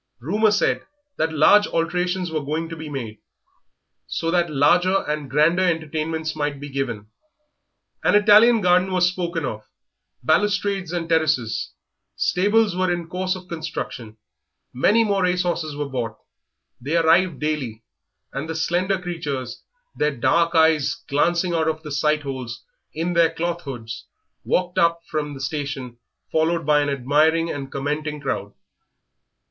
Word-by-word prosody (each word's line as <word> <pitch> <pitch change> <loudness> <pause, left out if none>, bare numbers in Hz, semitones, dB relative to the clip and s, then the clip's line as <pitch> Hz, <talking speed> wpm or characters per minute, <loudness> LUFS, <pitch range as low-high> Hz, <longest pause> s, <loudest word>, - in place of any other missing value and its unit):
Rumour 210 - +2
said 205 0 +1 0.3
that 160 0 0
large 180 +7 +5
alterations 180 +1 -1
were 155 -2 -2
going 160 +3 -3
to 165 - -6
be 160 -1 -8
made, 115 -7 -6 0.9
so 165 - -2
that 175 -1 +2
larger 175 +7 +3
and 150 -2 -3
grander 155 +7 +3
entertainments 160 -2 -1
might 145 -2 -2
be 145 0 -8
given; 110 -6 -4 0.9
an - - +3
Italian 215 +2 +6
garden 180 +1 +3
was 180 -1 +3
spoken 170 -3 -2
of, 110 -4 -4 0.6
balustrades 200 +3 +1
and 170 -2 -3
terraces, 155 -9 0 0.4
stables 205 +2 +2
were 185 0 +1
in 170 -1 -3
course 185 +1 -1
of 185 -1 -10
construction, 155 - -6 0.6
many 210 - +3
more 200 -3 +1
race 180 0 +1
horses 165 -4 -2
were 145 0 -3
bought; 120 -5 -4 0.6
they 145 +7 0
arrived 170 -1 +3
daily, 135 -8 -3 0.5
and 140 +4 -4
the 160 - -3
slender 175 +4 0
creatures, 145 -9 -5 0.3
their 150 -2 0
dark 170 +7 +2
eyes 160 -3 +4
glancing 170 +5 +1
out 160 -1 +1
of 160 0 -2
the 150 - -7
sight 150 +1 +1
holes 130 -4 -6 0.3
in 165 +3 -2
their 170 -1 +4
cloth 170 +1 -3
hoods, 115 -4 -7 0.4
walked 180 -1 0
up 170 0 +3
from 150 -2 -3
the - - -9
station 135 -3 -4 0.3
followed 165 0 +1
by 150 0 +4
an 145 - 0
admiring 150 +5 +2
and 135 -2 -6
commenting 150 +2 -3
crowd. 100 -8 -4
160 Hz, 145 wpm, -22 LUFS, 145-180 Hz, 0.9 s, Italian